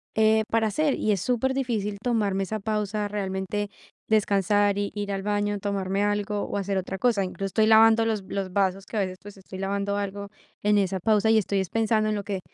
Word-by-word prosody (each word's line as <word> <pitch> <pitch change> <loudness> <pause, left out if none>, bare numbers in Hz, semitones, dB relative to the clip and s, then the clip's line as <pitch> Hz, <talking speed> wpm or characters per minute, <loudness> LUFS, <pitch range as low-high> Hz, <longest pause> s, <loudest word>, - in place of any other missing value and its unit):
eh, 220 0 +4
para 225 -1 +2
hacer. 295 +6 +1
Y 215 - 0
es 195 - 0
super 255 +2 0
difícil 220 -6 -2
tomarme 205 -5 0
esa 215 +3 -3
pausa, 210 0 -2
realmente 200 0 -3 0.4
descansar 205 -1 +2
y, 205 0 -2
ir 205 -1 -3
al 195 0 -3
baño, 205 0 -1
tomarme 195 0 -1
algo, 205 0 -1
o, - - -3
hacer 195 0 -1
otra 190 +1 -3
cosa. 225 -5 +2
Incluso 195 +1 -4
estoy 215 +2 +2
lavando 225 0 +6
los 215 -3 -1
los 195 -2 -3
vasos 195 0 0
que, 225 - -6
a - - +2
veces, 185 -1 -3
pues, 205 -1 -12
estoy 190 0 -10
lavando 200 +1 -1
algo 200 0 -4 0.3
en 210 0 +3
esa 190 -1 0
pausa, 215 +2 +2
y 220 - +5
estoy 200 -1 0
es 190 - -2
pensando, 220 -1 +1
en 215 - 0
lo 200 - -3
que 200 -2 -3
205 Hz, 215 wpm, -25 LUFS, 195-215 Hz, 0.4 s, lavando